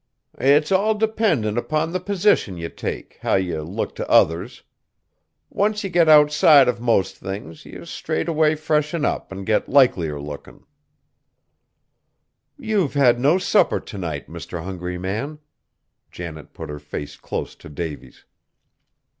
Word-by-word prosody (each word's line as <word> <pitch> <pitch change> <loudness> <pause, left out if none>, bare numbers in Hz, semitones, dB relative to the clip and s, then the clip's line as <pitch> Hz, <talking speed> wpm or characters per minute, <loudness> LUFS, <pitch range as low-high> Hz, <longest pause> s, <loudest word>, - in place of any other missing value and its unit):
"It's 145 +5 +3
all 205 +3 +3
dependin' 205 - +1
upon 155 +5 -1
the 185 - 0
position 185 - +1
ye 85 0 -4
take, - - -6
how - - +1
ye 90 -4 -1
look 90 +8 -4
t' - - -4
others. 90 +10 +2 0.9
Once 210 +1 0
ye 195 - -4
get 170 -2 +4
outside 150 -2 +6
of 120 -2 -1
most 115 -5 +1
things, 95 -5 -8
ye - - -10
straightway 155 - 0
freshen 150 0 0
up - - -2
an' 95 0 -6
get 110 +2 0
likelier 90 - +3
lookin'!" 75 0 -10 1.9
"You've 215 - -1
had 125 -4 +4
no 145 +8 +4
supper 190 +2 +2
to 105 - -10
night, 80 -6 -5
Mr. 85 -2 -7
Hungry 90 -1 -5
Man!" 110 +12 -4 0.7
Janet 80 -3 -9
put - - -8
her 75 - -7
face 75 0 -7
close - - -5
to - - -13
Davy's. 75 0 -7
125 Hz, 140 wpm, -22 LUFS, -, 1.9 s, outside